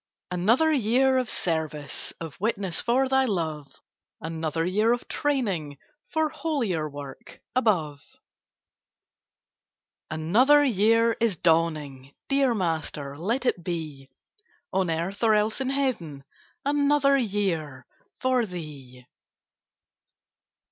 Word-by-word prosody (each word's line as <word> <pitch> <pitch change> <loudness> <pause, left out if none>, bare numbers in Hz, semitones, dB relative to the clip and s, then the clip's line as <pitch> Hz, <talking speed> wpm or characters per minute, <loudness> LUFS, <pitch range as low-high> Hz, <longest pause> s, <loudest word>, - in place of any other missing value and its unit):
Another 230 - +3
year 260 0 +3
of 250 -3 -2
service, 155 -6 -2
Of 160 -4 -7
witness 200 -5 -1
for 260 +3 +2
Thy 265 0 +3
love; 160 - -3 0.5
Another 160 0 -2
year 210 +6 +2
of 245 - -4
training 195 - -1 0.3
For 315 0 +1
holier 275 - -2
work 140 -2 -10 0.2
above. 165 - +1 2.1
Another 230 - +4
year 230 0 +3
is 225 -6 +1
dawning! 155 -5 0
Dear 275 -3 +2
Master, 160 -6 -3
let 225 - -2
it 175 -8 0
be 155 -6 -5 0.6
On 190 -2 +1
earth, 170 +5 -2
or 220 -1 +5
else 215 +4 0
in 260 - -1
heaven, 230 - -1 0.4
Another 285 -1 +3
year 185 - -1 0.3
for 255 -3 +1
Thee! 140 -8 -9
190 Hz, 105 wpm, -26 LUFS, 155-255 Hz, 2.1 s, or